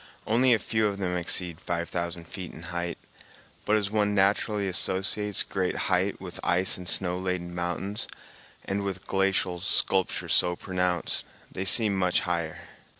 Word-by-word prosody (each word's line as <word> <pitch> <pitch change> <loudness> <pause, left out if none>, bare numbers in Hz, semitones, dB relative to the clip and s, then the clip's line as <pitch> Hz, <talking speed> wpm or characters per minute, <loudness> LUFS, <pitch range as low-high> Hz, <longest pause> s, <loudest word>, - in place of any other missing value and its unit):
Only 125 +4 +3
a 115 - +6
few 110 +1 0
of 100 -1 -3
them 90 -2 -2
exceed 85 -1 +1
five 85 -1 -2
thousand 85 -1 -4
feet 90 -1 -7
in 80 - -9
height; 85 -1 -3 0.7
but 105 - +4
as 105 -2 0
one 105 -1 +1
naturally 100 +1 +2
associates 95 +3 +3
great 95 -2 -2 0.2
height 95 +2 +1
with 90 -2 -8
ice 90 +2 +3
and 90 -1 -5
snow 90 -1 0
laden 90 -2 -3
mountains 90 +4 -2 0.6
and 100 +1 -1
with 95 -1 -4
glacial 95 -2 0
sculpture 95 0 +1
so 90 0 +3
pronounced, 90 -1 -1 0.3
they 95 - -4
seem 105 0 +4
much 90 -1 +2
higher. 85 -3 -3
95 Hz, 155 wpm, -27 LUFS, 90-100 Hz, 0.7 s, a